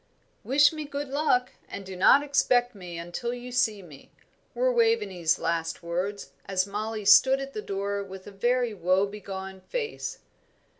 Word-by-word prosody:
"Wish 290 +3 +4
me 310 -1 -5
good 285 -1 -5
luck, 270 -3 +1 0.2
and 200 - -7
do 190 0 -8
not 270 +10 +6
expect 250 -3 +2
me 180 -4 -8
until 175 +8 -4
you 245 0 -8
see 220 -5 +1
me," 150 -6 -15 0.4
were - - +2
Waveney's 210 - +2
last 165 0 -2
words, 180 +4 -3 0.2
as 190 -1 +1
Mollie 210 +1 -4
stood 265 +6 +7
at 275 0 -6
the 215 - -4
door 200 0 -3
with 190 -1 -10
a 205 - -9
very 240 +3 0
woe 185 +1 +2
begone 195 -2 -7
face. 455 - -4
205 Hz, 160 wpm, -27 LUFS, 190-265 Hz, 0.4 s, stood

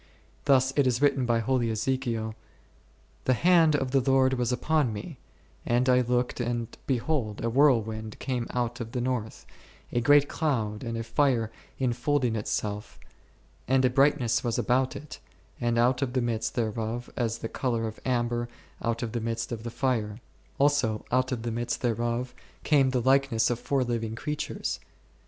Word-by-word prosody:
Thus 135 -2 +4
it 140 -3 +3
is 120 -1 +1
written 140 -3 +2
by 115 -1 +2
holy 125 -1 +1
Ezekiel, 115 -1 -1 0.9
The 130 - +3
hand 165 +1 +5
of 135 -3 -1
the 135 - +4
Lord 135 0 +3
was 125 -1 0
upon 145 +1 +1
me, 110 +8 -7 0.4
and 120 +2 +1
I 125 0 +5
looked, 125 +1 0
and 120 -1 -2
behold, 125 -5 -1
a 115 - 0
whirl 130 -3 +5
wind 110 0 -6
came 125 -3 -2
out 120 0 -2
of 115 0 -6
the 125 - -1
north, 120 -3 -3 0.5
a 120 - +1
great 145 +3 +5
cloud, 115 -11 -1
and 115 -1 -3
a 115 - -3
fire 115 -1 +1 0.3
infolding 125 0 0
itself, 105 -1 -3 0.7
and 130 0 +3
a 125 - +3
brightness 135 -3 +3
was 120 -2 -1
about 130 +1 +1
it, 150 - -9 0.4
and 120 -1 0
out 125 +2 +3
of 130 -3 -1
the 130 - +1
midst 115 -2 -2
thereof 115 0 -2
as 115 -2 -1
the 115 - -4
colour 115 -2 -1
of 110 0 -6
amber 120 -1 0 0.3
out 115 +1 -1
of 115 - -3
the 120 0 -2
midst 115 +1 -3
of 115 -2 -4
the 120 - -5
fire; 115 -4 -1 0.4
also 140 -7 +2
out 130 +1 +2
of 120 -3 -3
the 120 - -2
midst 120 +2 -3
thereof 120 +1 -1 0.3
came 140 -3 +4
the 130 - 0
o - - +1
o - - -8
likeness 135 -4 +3
of 120 - -2
four 135 -2 0
living 115 -2 -2
creatures. 150 +6 -3
120 Hz, 180 wpm, -27 LUFS, 115-130 Hz, 0.9 s, hand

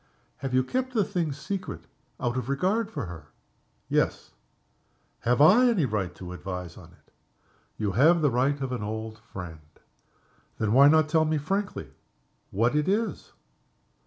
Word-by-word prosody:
"Have 135 -1 -4
you 130 - +4
kept 255 - -2
the 215 - +4
thing 175 -5 -1
a - - -3
secret 185 +7 -5 0.3
out 120 0 -1
of 125 0 -3
regard 195 +10 +1
for 140 - -4
her?" 85 -2 -9 0.6
"Yes." - - 0 0.9
"Have 120 +1 +1
I 205 - +7
any 195 -11 +2
right 100 -7 -2
to 90 +1 -8
advise 90 -2 -6
on - - -12
it?" - - -28 0.6
"You 105 -2 -1
have 155 - +4
the 145 - +4
right 135 +4 +1
of 135 -1 -2
an 125 - -3
old 110 +1 -5
friend." 90 -7 -9 1.0
"Then, 110 -1 0
why 140 +3 +8
not 155 0 +5
tell 160 0 +3
me 155 0 +1
frankly 195 +7 -3 0.6
what 115 +7 +1
it 150 0 +1
is?" 210 -2 -1
140 Hz, 160 wpm, -27 LUFS, 110-170 Hz, 1.0 s, why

